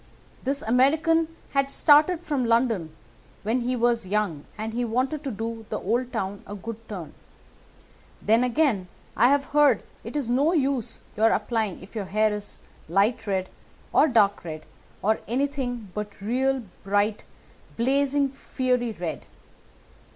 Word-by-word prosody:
This 275 +2 -2
American 310 +7 +3 0.2
had 275 0 +1
started 305 +4 +5
from 290 -6 -1
London 230 -7 +2 0.5
when 230 +4 +1
he 250 +1 0
was 235 -3 +1
young, 195 -7 -1
and 220 +1 -4
he 245 +1 -1
wanted 255 +6 -1
to 280 - -2
do 225 -1 -5
the - - -2
old 240 +5 -1
town 200 -3 -3
a 205 - -6
good 225 +3 -8
turn. 180 -7 -6 1.1
Then, 225 +3 +3
again, 250 -7 +1 0.3
I 240 - +5
have 280 0 +3
heard 295 -1 +5 0.2
it - - -8
is 285 -5 -1
no 275 +8 +3
use 275 -7 0
your 220 +2 +4
applying 215 -4 -1
if 190 - -14
your 210 -3 -2
hair 215 +3 +2
is 210 0 -7 0.3
light 210 +5 +2
red, 190 -2 0 0.5
or - - +6
dark 210 -6 +3
red, 155 -2 -7 0.4
or 220 +2 +2
anything 245 -4 -2
but 210 -1 -5
real 255 +5 0 0.2
bright, 205 +2 +1 0.5
blazing, 275 +3 +2
fiery 255 -3 -1
red. 170 -5 -5
235 Hz, 145 wpm, -25 LUFS, 210-270 Hz, 1.1 s, or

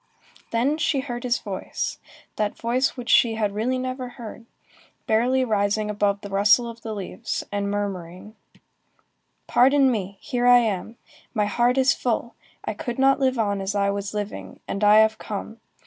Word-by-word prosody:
Then 265 +7 +1
she 280 -3 +1
heard 240 -3 -5
his 245 -1 +1
voice, 195 -3 -4 0.4
that 210 -1 -2
voice 250 +4 0
which 245 -1 -7
she 230 -2 +5
had 210 -2 -1
really 235 +5 0
never 255 0 -4
heard, 230 -1 -9 0.6
barely 250 +4 +2
rising 210 -1 0
above 205 -1 0
the 200 - -8
rustle 210 +5 +4
of 230 0 -9
the 220 -1 -5
leaves, 205 +4 -4
and 200 0 -1
murmuring:— 200 0 -5 1.1
"Pardon 270 +1 +4
me, 200 -3 -3
here 245 0 -1
I 245 0 +8
am. 225 -1 -1 0.4
My 210 -2 +2
heart 240 +5 +1
is 265 +1 +4
full. 235 -1 -2 0.3
I - - -2
could 235 +3 -5
not 270 +1 +4
live 260 -2 +1
on 205 -3 0
as 195 +2 -3
I 200 0 +2
was 200 0 -4
living, 210 0 -5
and 200 - -3
I 210 +1 +7
have 220 0 +2
come. 220 +2 -6
220 Hz, 170 wpm, -24 LUFS, 205-245 Hz, 1.1 s, I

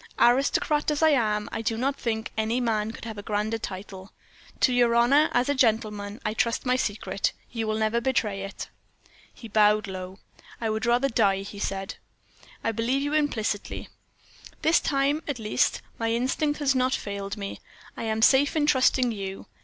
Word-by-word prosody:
Aristocrat 275 +5 +3
as 300 +1 0
I 315 - +6
am, 215 -6 +1
I - - -3
do 225 0 -1
not 270 +4 0
think 220 -4 -3
any 220 +3 0
man 220 -3 0
could 230 - -10
have 220 -2 -6
a - - -5
grander 215 +2 -2
title. 190 0 -8 0.5
To 255 - +4
your 240 -1 +3
honor, 275 +6 +5
as 245 +1 +2
a 285 - +2
gentleman, 215 -5 0
I 215 - 0
trust 230 +2 0
my 250 0 +2
secret 200 -5 -1 0.2
you 225 -2 -3
will 215 0 0
never 220 +2 +1
betray 215 -6 0
it." 195 +1 -6 0.6
He 230 - -11
bowed 210 0 +3
low. 185 -1 -7 0.4
"I 225 -2 -1
would 220 +2 -2
rather 245 +3 +3
die," 200 -6 +2
he 200 0 -9
said. 195 -1 -3 0.7
"I 225 - +1
believe 235 +5 0
you 290 +1 -2
implicitly. 230 -9 -1 0.7
This 320 +2 +5
time, 280 +2 +1
at 285 -4 -2
least, 215 -2 0 0.2
my 225 0 0
instinct 270 +5 0
has 275 -2 +3
not 260 0 +2
failed 200 0 -5
me 200 -1 -6 0.4
I - - -7
am 220 0 0
safe 280 +5 +5
in 305 -2 +2
trusting 260 -3 +3
you. 195 -3 -6
225 Hz, 180 wpm, -26 LUFS, 210-260 Hz, 0.7 s, I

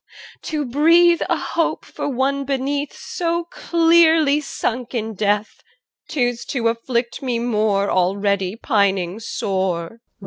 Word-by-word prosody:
EL. - - -18
To 300 -2 -3
breathe 335 +6 +4
A - - +2
hope 335 -1 -2
for - - -5
one 275 +2 0
beneath 280 +1 -2
So 340 0 -3
clearly 330 -3 +3
sunk 250 -3 -4
in 220 -1 -2
death, 210 +1 -1 0.5
'Tis 245 -5 -1
to 235 -4 0
afflict 235 +1 -2
me 250 -3 -1
more 215 -4 0
Already 195 +1 0
pining 200 -5 0
sore. 190 -3 -3
245 Hz, 125 wpm, -20 LUFS, 205-290 Hz, 0.5 s, breathe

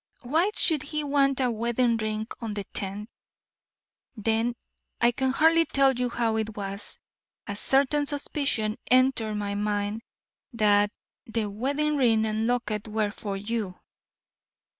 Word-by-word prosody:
Why 320 +10 +2
should 315 -5 +3
he 300 +1 -3
want 275 -2 +2
a 250 -2 +2
wedding 235 +1 +1
ring 215 0 -2
on 225 -3 -4
the 205 - -3
tenth. 200 +2 -4 1.1
Then 225 +2 0 0.4
I 235 +1 +5
can 265 +2 0
hardly 325 +4 +4
tell 275 -2 +3
you 250 0 -1
how 230 -2 0
it 220 -1 -3
was 200 0 -4 0.5
a 200 - -4
certain 280 +6 +2
suspicion 280 -7 -1
entered 255 -4 +3
my 205 -1 -2
mind 205 +1 -1 0.5
that 205 -2 +3 0.4
the 225 -1 -1
wedding 280 +9 -1
ring 225 -5 +3
and 220 +1 -1
locket 230 -4 -1
were 215 -1 0
for 200 -2 -5
you!" 205 -2 -3
230 Hz, 140 wpm, -27 LUFS, 210-270 Hz, 1.1 s, I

